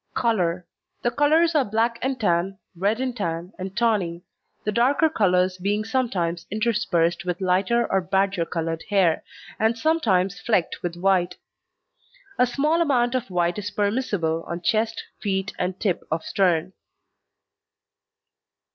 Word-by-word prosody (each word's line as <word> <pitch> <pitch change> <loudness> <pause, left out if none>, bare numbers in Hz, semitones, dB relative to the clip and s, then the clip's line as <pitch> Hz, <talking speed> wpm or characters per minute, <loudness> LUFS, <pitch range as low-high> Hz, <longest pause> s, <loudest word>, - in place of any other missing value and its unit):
COLOUR 180 -7 0 0.4
The 240 - +2
colours 315 +5 +3
are 295 -3 +4
black 230 +2 0
and 265 0 -1
tan, 190 -1 +1 0.2
red 200 +6 0
and 255 -2 -2
tan, 170 -3 -3
and 190 +2 -6
tawny 195 -8 +1 0.4
the 210 - -1
darker 270 +8 +3
colours 185 - +2
being 205 +3 -1
sometimes 195 -9 -1
interspersed 205 -6 +1
with 180 -1 -3
lighter 190 +6 +2
or 190 - +1
badger 195 -1 +1
coloured 165 -1 -3
hair 190 -6 +2 0.4
and 220 +1 +2
sometimes 210 - +1
flecked 210 -7 0
with 175 -1 -3
white. 180 -1 +1 1.0
A 250 - +5
small 300 +7 +1
amount 250 -6 +2
of 255 -3 -2
white 175 +1 0
is 205 0 -4
permissible 205 -6 -1
on 170 +1 -4
chest, 220 0 0 0.2
feet, 195 -1 -2
and 180 +1 -2
tip 190 -5 0
of 160 +1 -1
stern. 180 -2 +1
195 Hz, 140 wpm, -24 LUFS, 180-235 Hz, 1.0 s, A